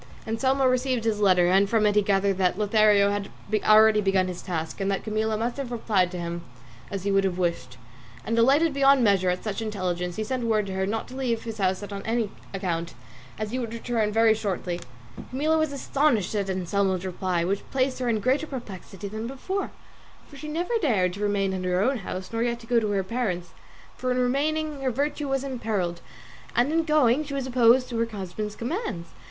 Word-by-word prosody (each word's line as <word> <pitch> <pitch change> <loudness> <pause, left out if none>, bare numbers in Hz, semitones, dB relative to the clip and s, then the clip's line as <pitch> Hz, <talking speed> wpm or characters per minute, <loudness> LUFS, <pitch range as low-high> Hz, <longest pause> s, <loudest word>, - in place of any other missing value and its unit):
Anselmo 260 +4 +1
received 255 -1 +1
this 220 -2 0
letter, 185 -3 +4
and 195 +2 +4
from 220 -1 +3
it 210 - +3
he 210 - +5
gathered 195 -1 +1
that 180 -1 +2
Lothario 210 -1 +4
had 205 -1 -3 0.3
already 215 0 +6
begun 195 -2 +2
his 180 -1 -5
task 165 +1 -4
and 195 - 0
that 195 - -1
Camilla 215 0 -1
must 235 +3 -2
have 270 -3 -4
replied 210 -6 +1
to 180 - -6
him 170 0 -4 0.5
as 195 -2 -4
he 200 - 0
would 195 0 +3
have 185 -2 -1
wished; 170 -8 -2 0.5
and 230 - -1
delighted 280 +7 +4
beyond 275 -1 +5
measure 195 -4 +3
at 180 0 -2
such 215 0 -3
intelligence 180 -5 -2
he 215 - -2
sent 245 +2 -2
word 215 -2 +2
to 195 - -5
her 190 0 -1
not 225 +2 -2
to 255 - -10
leave 240 -4 -1
his 225 -1 -6
house 190 0 0
on 200 -1 -6
any 225 -1 -1 0.2
account, 170 -4 -3 0.4
as 215 -1 -4
he 255 - -2
would 235 -3 -4
very 225 -1 +2
shortly 195 -4 -3 0.4
return. - - -10
Camilla 305 +5 +1
was 315 -2 +1
astonished 275 - +1
at 200 -2 -1
Anselmo's 190 0 0
reply, 180 -1 -1
which 195 +3 -1
placed 260 -1 0
her 250 -2 -1
in 220 -2 0
greater 265 +7 +1
perplexity 205 -6 -7
than 215 +3 -5
before, 375 +10 -3 0.6
for 290 - -14
she 300 +2 -8
neither 350 +9 -1
dared 195 - +2
to 200 - -8
remain 200 -2 +1
in 185 -1 -3
her 180 0 +1
own 255 +7 +2
house, 185 +1 -6
nor 225 - -1
yet 235 0 0
to - - -12
go 235 0 +3
to 215 -2 -2
her 200 -2 0
parents'; 190 -5 -3 0.4
for 255 - -3
in 250 - +1
remaining 290 +4 0
her 265 - +1
virtue 285 +3 -2
was 270 0 0
imperilled, 215 -10 -2 0.5
and 250 +6 +2
in 330 0 +2
going 300 -3 +3
she 280 -2 -6
was 270 -2 -2
opposing 245 -1 +3
her 230 - +2
husband's 210 -1 -5
commands. 235 - -4
215 Hz, 210 wpm, -26 LUFS, 195-255 Hz, 0.6 s, already